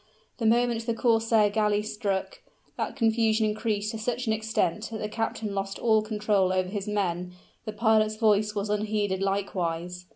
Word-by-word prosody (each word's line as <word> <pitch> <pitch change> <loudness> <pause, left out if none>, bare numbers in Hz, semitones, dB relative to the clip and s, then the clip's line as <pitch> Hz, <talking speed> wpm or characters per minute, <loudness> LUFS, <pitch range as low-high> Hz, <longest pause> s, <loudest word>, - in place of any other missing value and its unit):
The 225 - +1
moment 235 0 +2
the 230 - 0
corsair 225 -3 +3
galley 210 -1 +1
struck, 210 - -3 0.4
that - - -3
confusion 225 -1 +2
increased 215 -1 -1
to 225 - -6
such 245 +3 -2
an 220 - +1
extent 220 -2 -1
that 220 - -4
the 210 - -3
captain 220 -1 -3
lost 195 0 -3
all 220 -2 +3
control 210 -3 +1
over 185 0 0
his 200 0 -4
men; 180 -4 -2 0.3
the 215 - -3
pilot's 215 -1 +2
voice 215 -1 +2
was 205 0 -2
unheeded 210 -2 -1
likewise. 180 -3 -2
215 Hz, 165 wpm, -27 LUFS, 200-225 Hz, 0.4 s, corsair